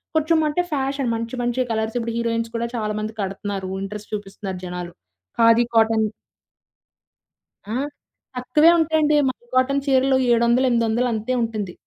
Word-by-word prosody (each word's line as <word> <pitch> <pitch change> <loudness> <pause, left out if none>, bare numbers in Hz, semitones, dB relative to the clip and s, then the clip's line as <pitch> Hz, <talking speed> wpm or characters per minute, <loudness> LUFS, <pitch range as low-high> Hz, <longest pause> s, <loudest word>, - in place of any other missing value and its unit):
కొంచెం 315 +1 +3
అంటే 300 +4 +1
ఫ్యాషన్. 275 -2 -1
మంచి 230 +2 -4
మంచి 240 +1 0
కలర్స్. 220 0 -2
ఇప్పుడు 230 -1 -2
హీరోయిన్స్ 230 0 -1
కూడా 235 +1 -1
చాలా 215 -2 -2
మంది 215 +1 -4
కడుతున్నారు. 195 0 -4
ఇంట్రెస్ట్ 210 +2 -7
చూపిస్తున్నారు 195 -2 -6
జనాలు. 180 -1 -6 0.5
'ఖాదీ' 230 +1 +5
కాటన్ 220 -1 +4 1.6
ఆ! - - -3 0.6
తక్కువే 255 +6 +4
ఉంటాయండి. 310 -2 +2
'మల్' 240 -2 -6
కాటన్ 275 +2 +2
చీరలు 265 0 +3
700 235 +2 +3
800 235 +1 +1
అంతే 220 +3 -2
ఉంటుంది. 215 -5 -3
230 Hz, 135 wpm, -22 LUFS, 215-260 Hz, 1.6 s, ఖాదీ